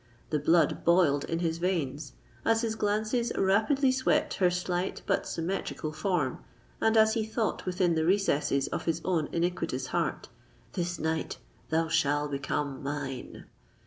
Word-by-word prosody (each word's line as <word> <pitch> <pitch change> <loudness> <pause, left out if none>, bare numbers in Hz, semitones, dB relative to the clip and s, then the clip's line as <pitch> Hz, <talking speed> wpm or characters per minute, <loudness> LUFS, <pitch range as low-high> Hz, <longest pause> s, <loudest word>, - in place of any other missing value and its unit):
The 150 - +2
blood 165 +3 +3
boiled 170 -5 +4
in 165 - -2
his 165 -1 -1
veins, 150 -6 -2 0.3
as 225 +1 +2
his 225 -1 0
glances 220 +3 0
rapidly 240 +8 +3
swept 260 0 +1
her 180 -2 +4
slight 180 +1 -2
but - - 0
symmetrical 165 -2 -3
form, 165 -7 -1 0.4
and 225 0 +3
as 220 0 +6
he 225 -1 0
thought 220 -2 -2
within 180 -1 +2
the 160 -1 +1
recesses 160 -7 +2
of - - -4
his 165 - 0
own 170 -5 0
iniquitous 165 -6 -1
heart, - - -1 0.5
"This 175 -1 -2
night 160 0 -2 0.3
thou 160 +1 +1
shall 145 -2 +1
become 140 0 -3
mine!" 140 -2 -5
170 Hz, 145 wpm, -29 LUFS, 150-200 Hz, 0.5 s, as